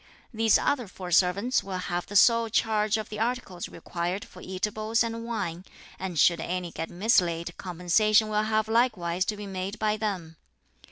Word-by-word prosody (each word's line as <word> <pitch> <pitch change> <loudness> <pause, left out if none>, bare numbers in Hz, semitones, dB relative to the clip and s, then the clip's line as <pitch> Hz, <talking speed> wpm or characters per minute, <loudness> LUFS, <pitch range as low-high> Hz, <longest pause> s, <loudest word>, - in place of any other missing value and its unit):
These 225 -1 +4
other 255 -6 0
four 185 -1 -8
servants 195 +8 +3
will 190 -1 -4
have 175 -1 -3
the 205 - -8
sole 230 +2 +5
charge 215 -1 +1
of 215 - -5
the 210 - -6
articles 225 -6 -3
required 175 +3 -4
for 180 - -14
eatables 215 +4 -1
and 230 0 -4
wine; 180 -7 -3 0.4
and 185 -3 -4
should 170 +3 +4
any 180 0 -3
get 165 - -5
mislaid 175 -4 +1
compensation 195 +5 +2
will 210 0 +1
have 215 0 +1
likewise 200 -7 +1
to 210 - -2
be 205 - -7
made 195 +1 -4
by 215 0 0
them. 185 -7 -4
200 Hz, 170 wpm, -27 LUFS, 180-220 Hz, 0.4 s, sole